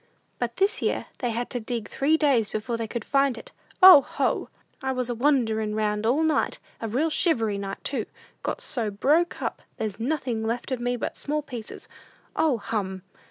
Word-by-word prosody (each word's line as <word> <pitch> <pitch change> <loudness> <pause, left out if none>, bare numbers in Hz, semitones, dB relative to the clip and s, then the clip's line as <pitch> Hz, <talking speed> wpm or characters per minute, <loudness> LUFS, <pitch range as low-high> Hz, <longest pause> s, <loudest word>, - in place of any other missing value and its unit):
But 240 -1 -2
this 395 +3 +1
year - - 0
they 245 - -1
had 235 +1 -3
to 245 - -1
dig 230 -1 -4
three 305 +4 +2
days 270 -9 +3
before 220 +3 -3
they 230 -1 -3
could 235 -1 -5
find 275 -3 +2
it. - - -11 0.3
O, 370 -6 +12
ho! - - -1 0.3
"I 265 -1 -1
was 250 -2 -2
a - - -2
wanderin' 225 -5 +1
round 210 0 0
all 250 +5 +3
last - - +4
night; 310 - +1 0.2
a 225 - -2
real 280 +9 0
shivery 225 - +1
night, 195 0 -6
too! 255 -6 -2 0.3
Got - - -3
so 230 -5 -2
broke 295 +12 +1
up, - - -3 0.2
there's 215 -1 -3
nothing 245 -3 -1
left 235 +4 -2
of 255 - -1
me 245 +1 0
but 240 - -4
small 300 +1 -2
pieces. 240 -6 -8 0.5
O, 295 -6 +2
hum! 195 -3 -3
240 Hz, 195 wpm, -26 LUFS, 220-275 Hz, 0.5 s, O